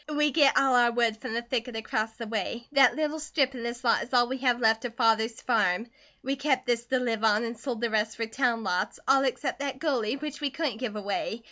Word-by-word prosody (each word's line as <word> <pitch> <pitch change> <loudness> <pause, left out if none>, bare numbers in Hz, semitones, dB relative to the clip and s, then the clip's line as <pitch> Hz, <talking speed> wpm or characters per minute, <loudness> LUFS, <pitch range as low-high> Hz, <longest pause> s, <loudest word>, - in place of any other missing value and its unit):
"We 300 0 +1
git 285 -2 +4
all 270 -1 +4
our 240 -1 +5
wood 235 -2 0
from 220 - -4
the 235 - -2
thicket 240 0 -3
across 220 0 -2
the 230 +1 -7
way. 225 +2 -4
That 275 -3 +5
little 310 +1 -2
strip 285 -3 0
an' 250 - -7
this 235 +1 -5
lot 235 - +3
is - - -7
all 240 -1 +5
we 260 +1 -4
have 250 -2 +2
left 225 -1 +2
of 240 -2 -5
father's 225 -1 +2
farm. 225 -1 +1 0.3
We 270 +2 -1
kept 275 -1 0
this 235 -1 0
to 260 - +1
live 230 -3 -2
on, 215 0 +3
and 230 0 -4
sold 235 0 -5
the 235 -2 0
rest 215 0 0
for 230 - -1
town 230 0 0
lots, 180 -2 -2
all 270 0 +5
except 265 +2 -2
that 275 -2 -3
gully, 260 -7 -1
which 295 0 -6
we 290 - 0
couldn't 280 -5 -3
give 245 -4 -4
away. 205 +2 -3
240 Hz, 245 wpm, -27 LUFS, 225-270 Hz, 0.3 s, our